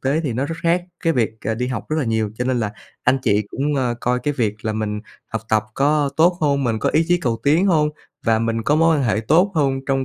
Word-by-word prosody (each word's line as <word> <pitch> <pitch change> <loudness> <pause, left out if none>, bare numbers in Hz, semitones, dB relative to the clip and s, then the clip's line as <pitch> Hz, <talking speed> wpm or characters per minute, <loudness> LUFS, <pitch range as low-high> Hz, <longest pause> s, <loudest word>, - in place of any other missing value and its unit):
tế 140 +4 +1
thì 140 -7 -2
nó 130 +4 -1
rất 165 +3 -4
khác 170 +1 +2 0.2
cái 165 - +3
việc, 115 -6 +1
ờ, 110 - 0
đi 125 +2 -2
học 125 -5 -4
rất 155 - -1
là 145 - 0
nhiều. 110 -2 0
Cho 125 - -1
nên 125 -1 0
là 105 -1 -2 0.3
anh 130 +2 +3
chị 105 -2 +2
cũng, 145 +2 -1
ờ, 125 -3 0
coi 125 +1 +1
cái 145 -1 -1
việc 110 -5 0
là 110 - 0
mình 105 -1 -3 0.3
học 110 -1 -4
tập 110 -1 +2
có 145 0 +2
tốt 175 +2 +4
hông, 140 -2 +1
mình 115 -2 0
có - - 0
ý 160 +2 +3
chí 175 0 +3
cầu 115 -5 -1
tiến 160 +7 +3
hông 155 -5 +3 0.4
và 110 -1 +4
mình 115 0 -1
có 145 - +2
mối 165 0 +4
quan 140 - 0
hệ 110 -1 +1
tốt 170 - +3
hông 135 -3 +1
trong 135 -1 0
135 Hz, 275 wpm, -21 LUFS, 115-150 Hz, 0.4 s, tốt